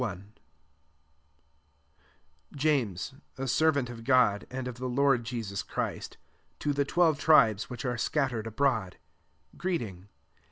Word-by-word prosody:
1 100 -2 -5 2.2
JAMES, 135 - 0 0.2
a 135 0 -3
servant 140 -1 +2
of 120 -1 -9
God 125 -5 +3
pd 130 0 -4
of 125 -1 -6
the 130 0 -3
Lord 135 -1 +3
Jesus 110 -4 -4
Christ, - - -4 0.4
p 145 - -1
the 140 0 +1
twelve 160 -1 +2
tribes 110 -10 +4
which 125 +2 -6
are 120 -1 -1 0.2
mattered 125 -7 0
abroad, 115 -5 0 0.6
greeting. 115 - -3
125 Hz, 120 wpm, -29 LUFS, 110-140 Hz, 2.2 s, tribes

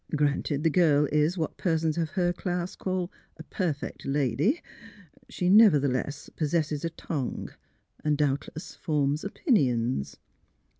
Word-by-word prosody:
" - - 0
Granted 145 0 0
the 165 - +3
girl 150 -4 +4
is 150 +4 +2
what 160 -3 -3
persons 160 -3 +1
of 165 -2 -1
her 175 -1 +2
class 175 0 -3
call 185 -1 -2
' - - -37
a 160 - -9
perfect 160 -4 -3
lady 140 - +1
^; 345 - -15 0.7
she 180 - -2
nevertheless 145 - +4
possesses 155 -1 -1
a 165 - 0
tongue, 155 -5 -4 0.5
and 150 -1 +1
doubtless 145 +2 -2
forms 150 -1 0
opinions." 130 - 0
155 Hz, 140 wpm, -27 LUFS, 145-175 Hz, 0.7 s, girl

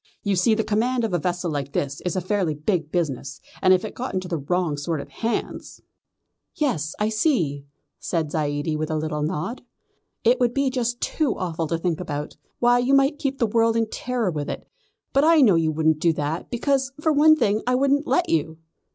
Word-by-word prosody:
You 200 -2 +1
see 200 +5 +3
the 220 - 0
command 235 +4 0
of 220 -5 -1
a 175 - +2
vessel 175 +1 -2
like 140 -2 -4
this 140 -1 -2
is 180 - -2
a 185 - 0
fairly 185 -4 0
big 160 0 -1
business, 140 -5 -2 0.2
and 185 - +5
if 185 +2 +4
it 215 - -6
got 255 -3 -5
into 185 -1 -2
the 170 -3 -2
wrong 170 +2 0
sort 150 +2 -3
of - - -8
hands 230 0 -4 0.4
" - - -54 0.3
"Yes, 160 - -1
I 210 +1 0
see," 175 - 0 0.3
said 160 -4 -2
Zaidie 145 0 -1
with 155 0 -2
a 155 - -1
little 155 -1 -2
nod. 160 +9 -3 0.6
"It 240 +3 +4
would 245 -1 +1
be 275 -1 +1
just 240 -2 -2
too 300 -7 0
awful 165 -3 -2
to 165 - -1
think 165 -1 -1
about. 150 -4 -5 0.2
Why 245 0 +4
you 255 +3 +3
might 275 +2 +3
keep 275 -2 -2
the 235 - +2
world 230 +1 +2
in 225 -1 0
terror 240 -6 -1
with 150 -2 -4
it; - - -6 0.5
but 275 - +4
I 320 0 +6
know 225 -8 +6
you 165 -2 +2
wouldn't 155 0 +1
do 170 0 +3
that, 155 +2 -3
because, 265 +2 0
for 315 0 +2
one 310 +2 +6
thing, 215 -7 +1
I 250 - +3
wouldn't 280 +3 +2
let 355 - +2
you." 160 0 0
185 Hz, 215 wpm, -23 LUFS, 155-245 Hz, 0.6 s, I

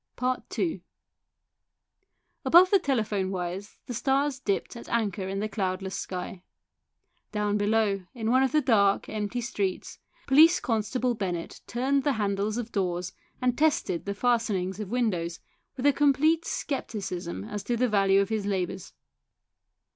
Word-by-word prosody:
II 335 - -1 1.6
Above 360 +2 +6
the 395 - +6
telephone 215 - 0
wires 185 +2 -5
the 245 - -5
stars 270 +3 +1
dipped 200 -3 -2
at 235 - -10
anchor 205 -5 -1
in 195 +1 -3
the 215 - -1
cloudless 190 -2 -3
sky. 180 0 -5 0.9
Down 210 -1 0
below, 205 -2 +1
in 225 -1 -1
one 260 +1 +5
of 265 - +2
the 305 - +3
dark, 200 -6 +3
empty 215 +3 -3
streets, 200 -5 -3 0.3
Police 310 +5 +6
constable 240 +2 0
Bennett 180 -6 -4
turned 270 +3 0
the 285 - +2
handles 205 0 -1
of 240 -1 -4
doors 180 -2 -2 0.3
and 250 -1 +2
tested 305 - +1
the 200 - -2
fastenings 210 -5 0
of 210 -3 -5
windows, 185 -9 -1 0.4
with 255 - -3
a 285 - +6
complete 300 +4 +3
scepticism 185 - -4
as 205 - -5
to 240 - 0
the 250 +2 +2
value 195 -2 +4
of 200 - -2
his 215 -2 -1
labours. 185 -2 -3
215 Hz, 145 wpm, -27 LUFS, 195-250 Hz, 1.6 s, Above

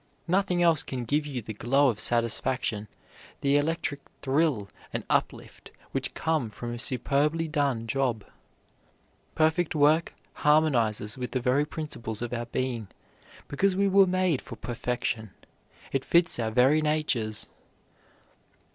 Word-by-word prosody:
Nothing 180 -1 +2
else 165 -3 +4
can 130 -3 -5
give 150 +5 0
you 130 -5 -4
the 110 - -6
glow 135 +7 +3
of 110 -3 -2
satisfaction, 115 -2 0 0.5
the 140 0 +2
electric 145 -1 0 0.2
thrill 135 -6 +1 0.2
and - - -3
uplift - - -2 0.2
which - - -2
come 160 -8 0
from 120 +2 -6
a 120 - -6
superbly 145 +6 0
done 140 -7 0
job. 120 -3 -1 1.1
Perfect 160 +1 +2
work 155 +2 +3 0.2
harmonizes 125 -8 +2
with 125 - -4
the 130 - +1
very 130 +4 +2
principles 120 -8 -5
of 120 0 -4
our 120 -1 -3
being, 120 -3 -2 0.6
because 190 +6 +1
we 200 +1 +2
were 195 0 +5
made 185 -5 +1
for - - -9
perfection. 115 -3 -3 0.6
It 135 -1 0
fits 170 -6 +2
our 110 -1 0
very 130 +7 +4
natures. 150 -9 0
135 Hz, 135 wpm, -27 LUFS, 120-155 Hz, 1.1 s, were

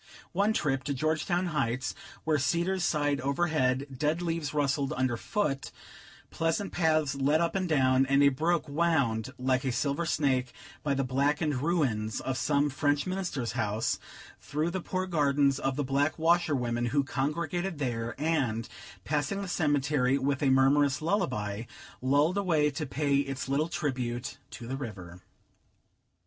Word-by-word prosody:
One 200 +4 +2
trip 135 -10 0
to 140 - -1
Georgetown 160 +5 0
Heights, 130 -3 -1 0.3
where 155 -2 +1
cedars 175 +6 0
sighed 145 -4 +1
overhead, 140 -2 +1
dead 150 +5 0
leaves 165 -4 -2
rustled 145 -1 0
underfoot, 135 - -1 0.6
pleasant 165 +4 -1
paths 155 -4 +2
led 140 +3 +2
up 170 0 +1
and 185 -2 -1
down, 130 -3 +3
and 140 +1 +4
a 140 - +7
brook 160 +5 0
wound 140 -8 +1
like 130 0 +1
a 130 - 0
silver 140 +6 -1
snake 130 -5 +1 0.3
by 140 -2 0
the 135 - 0
blackened 140 +2 0
ruins 130 -10 0
of 130 - -3
some 145 0 +2
French 145 +1 +1
Minister's 185 -10 -2
house, 105 +2 -1 0.4
through 155 +4 -2
the 190 +1 -3
poor 185 +2 -2
gardens 140 -5 +2
of 135 -1 -1
the 145 - -1
black 140 +3 +1
washerwomen 145 -8 +1
who 140 +4 +2
congregated 160 +6 -2
there, 120 -4 -3
and, 130 -8 0 0.4
passing 150 - -1
the - - -5
cemetery 145 -5 +1
with 140 0 -1
a 140 - +3
murmurous 140 +2 +4
lullaby, 115 - -1 0.4
rolled 145 +8 +2
away 155 -6 +2
to 145 +2 -4
pay 140 0 +1
its 135 -1 -2
little 145 +4 0
tribute 125 -7 -3
to 120 - -9
the 130 +3 -4
river. 90 -9 -8
145 Hz, 150 wpm, -29 LUFS, 130-160 Hz, 0.6 s, a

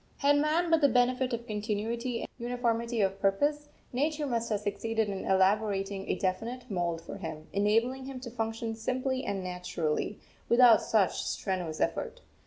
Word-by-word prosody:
Had 285 0 +4
man 320 +4 +2
but 325 -1 +5
the 285 - +6
benefit 250 +1 +2
of 235 0 -3
continuity 225 +3 -2
and - - -6
uniformity 235 -1 0
of 195 0 0
purpose, 290 +10 +1 0.2
Nature 300 +4 0
must 235 -3 -1
have 210 -2 0
succeeded 220 +1 -1
in 195 -1 -4
elaborating 195 0 +1
a - - +2
definite 225 +6 -3
mould 170 -3 -1
for 185 - -8
him, 160 -4 -6
enabling 230 +6 +1
him 265 -1 -6
to 240 -2 -7
function 225 -1 -3
simply 255 +4 -2
and 195 -2 -2
naturally, 180 0 -2 0.3
without 235 -2 +7
such 210 -4 +2
strenuous 180 -5 -3
effort. - - -1
225 Hz, 160 wpm, -30 LUFS, 195-255 Hz, 0.3 s, without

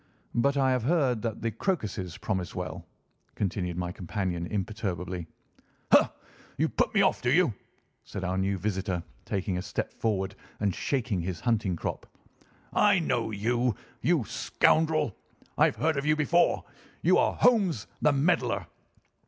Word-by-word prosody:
"But 140 +4 +2
I 135 -1 +3
have 125 -1 +2
heard 130 -4 +2
that 115 -2 -3
the 115 - 0
crocuses 105 - -2
promise 95 -4 -3
well," 90 -3 -5 0.5
continued 90 -3 -2
my 90 -1 -2
companion 90 -1 -3
imperturbably. 95 -4 -3 0.6
"Ha! - - +6 0.5
You - - +2
put - - +1
me - - +6
off, - - +2
do 125 - +1
you?" 165 -4 +4 0.5
said 100 - -6
our 90 0 -1
new 95 +1 0
visitor, 95 -2 -2 0.2
taking 95 -2 -1
a - - -2
step - - -4
forward 95 -4 -1 0.3
and 100 -2 +1
shaking 115 -7 -1
his 85 -1 -4
hunting 110 -6 +1
crop. - - -4 0.7
"I 205 -1 +5
know 125 -9 0
you, 120 +2 0 0.3
you 165 -5 +2
scoundrel! 155 +3 +2 0.4
I - - +5
have - - +1
heard 155 -1 +1
of 140 - -1
you 155 - +4
before. 160 +3 +3 0.4
You - - +5
are - - +2
Holmes, 195 - +3 0.2
the 150 - +5
meddler." 135 - +1
110 Hz, 155 wpm, -28 LUFS, 95-140 Hz, 0.7 s, Ha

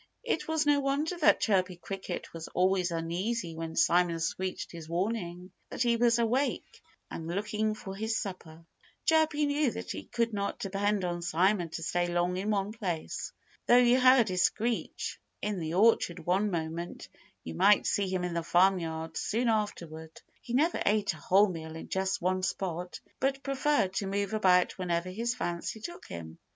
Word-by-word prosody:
It 485 - -1
was 320 -1 +1
no 290 -1 +4
wonder 280 +5 0
that 305 - +5
Chirpy 185 -3 +2
Cricket 190 +1 -6
was 165 -1 -7
always 185 0 +1
uneasy 170 +4 -2
when 165 0 -5
Simon 170 0 +3
screeched 185 +3 -3
his 165 -2 -9
warning 180 -1 -3 0.2
that - - -1
he 235 -1 +3
was 235 0 +3
awake 245 +4 -1 0.3
and 165 - -6
looking 210 +4 -1
for 195 -2 -8
his 220 +2 -1
supper. 165 -5 -7 0.4
Chirpy 315 -2 +3
knew 290 -1 +2
that - - -6
he - - -6
could 230 -1 -1
not 200 -1 -2
depend 200 0 -1
on 175 -1 -2
Simon 175 +1 +1
to 165 +1 -6
stay 175 +1 0
long 175 +1 0
in 200 +3 -2
one 200 -1 0
place. 185 -8 -4 0.4
Though 245 - +7
you 250 +1 +5
heard 255 -3 +6
his 185 -1 0
screech 230 +5 -1 0.2
in 210 -2 -2
the 160 0 -3
orchard 185 -5 +3
one 190 +4 +2
moment, 170 -1 -4 0.4
you 80 - -6
might 205 - +5
see 200 -1 +1
him 185 -1 -1
in 180 -1 -2
the 170 - -1
farmyard 165 -2 +1
soon 235 +3 0
afterward. 165 -7 -3 0.2
He 240 - -7
never 320 +6 +2
ate 205 -2 +2
a - - -11
whole 195 +7 +4
meal 160 -2 -6
in 160 - -8
just 190 0 0
one 185 +1 +1
spot, 180 -1 -3 0.2
but 270 0 0
preferred 275 -8 +1
to 195 - -1
move 200 +1 -1
about 185 -4 +3
wherever 175 -1 -1
his 235 +5 -2
fancy 175 -1 -3
took 345 +11 -8
him. 80 -2 -8
190 Hz, 175 wpm, -30 LUFS, 175-225 Hz, 0.4 s, Though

